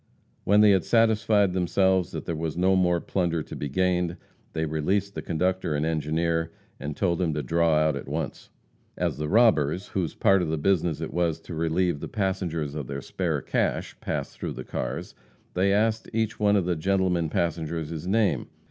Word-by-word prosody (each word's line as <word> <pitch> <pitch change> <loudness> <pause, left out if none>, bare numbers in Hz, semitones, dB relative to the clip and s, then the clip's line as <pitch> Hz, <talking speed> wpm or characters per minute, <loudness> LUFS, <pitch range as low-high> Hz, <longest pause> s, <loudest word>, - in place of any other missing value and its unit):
When 105 +2 +5
they 105 -1 +7
had 95 -4 +3
satisfied 110 -4 +3
themselves 95 0 +2
that - - -6
there 85 - -2
was 80 0 -3
no 95 +2 +3
more 90 -2 +3
plunder 85 -3 -1
to - - -9
be 70 - -4
gained, 90 +2 0 0.4
they 80 0 -1
released 95 +6 -1
the - - -4
conductor 90 -1 -1
and 75 +2 0
engineer, 80 +1 0 0.3
and 75 +2 -5
told 85 -4 +1
them 85 -5 0
to 75 - -2
draw 85 +4 +2
out 75 -1 +2
at 70 - -6
once. 75 +1 -4 0.5
As - - -1
the 75 0 -2
robbers, 95 -6 +3
whose 90 -4 -2
part 95 -1 +4
of 85 - -1
the 80 0 -1
business 85 -1 +1
it - - -4
was 85 -2 0
to 85 - -9
relieve 85 0 0
the - - -5
passengers 85 -7 -2
of 75 -4 -5
their 70 0 -4
spare - - -2
cash, - - -1
passed - - -4
through - - -3
the 65 - -7
cars, - - -4 0.4
they 95 +2 +2
asked 110 +2 +1
each 110 0 -1
one 105 -1 +4
of 95 -4 +2
the 90 -1 0
gentlemen 90 -1 +1
passengers 80 -1 -2
his 80 +1 -6
name. 105 0 +1
85 Hz, 195 wpm, -26 LUFS, 80-95 Hz, 0.5 s, they